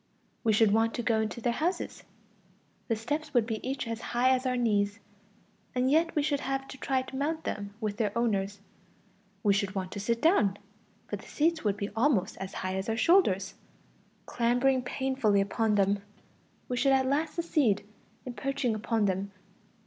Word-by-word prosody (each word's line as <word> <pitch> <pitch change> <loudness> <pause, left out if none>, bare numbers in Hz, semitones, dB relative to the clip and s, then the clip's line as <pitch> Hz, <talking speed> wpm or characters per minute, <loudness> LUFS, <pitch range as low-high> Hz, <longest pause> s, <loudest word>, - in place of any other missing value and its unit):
We 225 - +3
should 215 0 +4
want 225 +1 +2
to 240 - -2
go 225 -2 +2
into 220 +2 -3
their 240 +1 +1
houses; 340 +9 -2 0.9
the 225 - +1
steps 290 +6 -4
would 235 -3 +4
be 220 -2 -3
each 265 -1 -3
as 230 0 -4
high 245 +2 +1
as 260 0 +1
our 250 0 0
knees, 205 -4 +1 0.8
and 255 +1 +2
yet 330 +2 +3
we 300 - +2
should 285 -1 +1
have 270 0 -3
to 265 - -8
try 265 -1 0
to 265 - -10
mount 315 +4 -1
them 200 0 -4
with 210 -3 -3
their 210 -3 0
owners; 200 -4 0 0.8
we 205 -2 +4
should 200 0 -1
want 185 -1 -3
to - - -5
sit 230 +3 0
down, 220 - +3 0.5
but - - -2
the - - -14
seats 325 +2 +1
would 205 -2 +1
be 200 0 -3
almost 225 -6 +2
as 190 0 -6
high 185 0 -1
as 190 +3 -3
our 225 - 0
shoulders; 200 - +3 0.7
clambering 245 +2 +2
painfully 250 -5 +1
upon 210 +2 +1
them, 200 0 +2 0.7
we 250 - -2
should 270 +2 +3
at 265 0 +3
last 290 +4 0
succeed 295 - +1 0.4
in 250 - -5
perching 270 -2 -1
upon 220 0 0
them. 195 +1 -1
235 Hz, 185 wpm, -29 LUFS, 205-270 Hz, 0.9 s, should